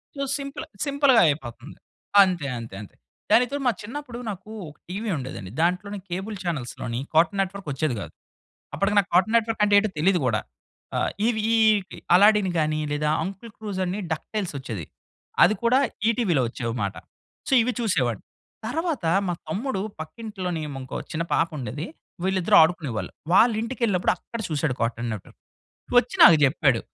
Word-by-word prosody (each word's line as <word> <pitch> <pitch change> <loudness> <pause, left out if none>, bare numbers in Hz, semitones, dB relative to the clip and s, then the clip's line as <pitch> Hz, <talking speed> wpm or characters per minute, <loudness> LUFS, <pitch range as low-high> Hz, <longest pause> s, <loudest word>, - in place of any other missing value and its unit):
So 280 - -5 0.2
simple 275 -1 -6 0.2
సింపుల్‌గాయిపోతుంది. 160 - +2 0.4
అంతే. 180 -7 +2
అంతే. 115 -4 -8
అంతే. 105 - -12 0.4
దానికితో 245 +5 +4
మా - - +5
చిన్నప్పుడు 245 +2 -7
నాకు 200 +1 -7 0.2
ఒక 150 - -17
టీవీ 210 +5 -3
ఉండేదండి 125 -8 -7
దాంట్లోనే 185 +4 0
కేబుల్ 190 +5 -4
చానెల్స్‌లోని 125 -7 -3
కార్టూన్ 170 +5 +3
నెట్వర్క్ 195 -1 -5
వచ్చేది 140 -1 -1
కాదు. - - -8 0.6
అప్పటికి 200 +1 0
నాకు 195 - -1
కార్టూన్ 190 +6 +4
నెట్వర్క్ 225 -1 -1
అంటే 205 0 +3
ఏంటో 215 +1 +3
తెలీదు 180 +3 +3
కూడా. 115 -4 +2 0.6
ఆ! - - +2 0.3
ఇవి 225 -2 +1
ఈ - - +5 0.6
'అల్లాడిన్' 205 -1 +5
గాని, 155 0 0
లేదా 150 +1 0
'అంకుల్ 195 +5 -7
స్క్రూజ్' 205 -3 -5
అని 185 +3 -3
'డక్‌టైల్స్' 180 +2 -3
వచ్చేది. 110 - -6 0.6
అది 215 - +5
కూడా 245 +3 +4 0.3
ఈ - - +5
టీవీ‌లో 180 - +2
వచ్చేవిమాట. 115 -4 -3 0.5
సో - - +1
ఇవి 245 +2 +1
చూసేవాడు. 130 - 0 0.5
తరువాత 320 - -2 0.2
మా 175 - 0 0.2
తమ్ముడు 200 - -2 0.2
పక్కింట్లో‌‌ని 185 -1 -5 0.2
ఇంకో 130 - -6 0.2
చిన్న 165 +1 -1
పాప 165 - +3
ఉండేది 130 +4 -5 0.4
వీళ్ళిద్దరూ 190 -1 +2
ఆడుకునేవాళ్ళు. 145 - 0 0.2
వాళ్ళ 230 +5 +6
ఇంటికేళ్ళినప్పుడు 225 -6 0
అక్కడ 230 - -8
చూసాడు 150 -3 -1
కార్టూ‌న్ 115 +1 -1
నెట్వర్క్. 105 - -10 0.6
వచ్చి 245 0 +3
నాకు 165 - +9
చెప్పాడు. 135 -3 +2
180 Hz, 145 wpm, -24 LUFS, 145-220 Hz, 0.6 s, నాకు